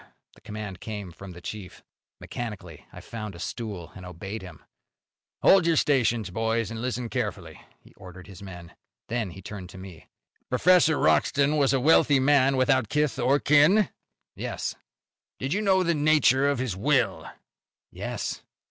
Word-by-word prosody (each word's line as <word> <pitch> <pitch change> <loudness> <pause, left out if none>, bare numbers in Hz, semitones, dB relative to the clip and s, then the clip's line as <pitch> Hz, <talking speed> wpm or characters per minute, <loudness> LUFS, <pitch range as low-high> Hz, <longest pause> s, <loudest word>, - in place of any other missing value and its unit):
The - - -22
command 105 -4 -7
came 105 -5 -6
from 95 +2 -11
the 90 - -12
chief. 100 -1 -8 0.4
Mechanically 100 -10 -7
I - - -11
found 110 -4 -7
a - - -11
stool, 100 -3 -6
and 95 - -10
obeyed 95 +4 -7
him. 95 -1 -12 0.8
"Hold 190 -3 +6
your 165 - +3
stations, 120 - +1
boys, 115 +2 -1
and 115 0 -5
listen 125 -1 -3
carefully," 105 - -4 0.2
he - - -21
ordered 90 0 -12
his 95 0 -13
men. 90 -3 -10 0.4
Then 115 -4 -2
he 95 +2 -11
turned 95 -4 -8
to 95 - -12
me. 95 -4 -11 0.4
"Professor 160 +3 +4
Wroxton 140 +1 +2
was 140 -3 +3
a 135 - +2
wealthy 145 0 +4
man 135 0 +3
without 130 -3 +2
kith 150 -2 0
or 130 +3 +3
kin?" 150 +9 +4 0.5
"Yes." - - -4 0.6
"Do - - -5
you 180 +11 0
know 190 -3 +3
the 170 -1 +1
nature 145 -3 +3
of 140 - 0
his 120 -6 -2
will?" 125 +4 +1 0.6
"Yes." - - -5
115 Hz, 160 wpm, -26 LUFS, 95-140 Hz, 0.8 s, Hold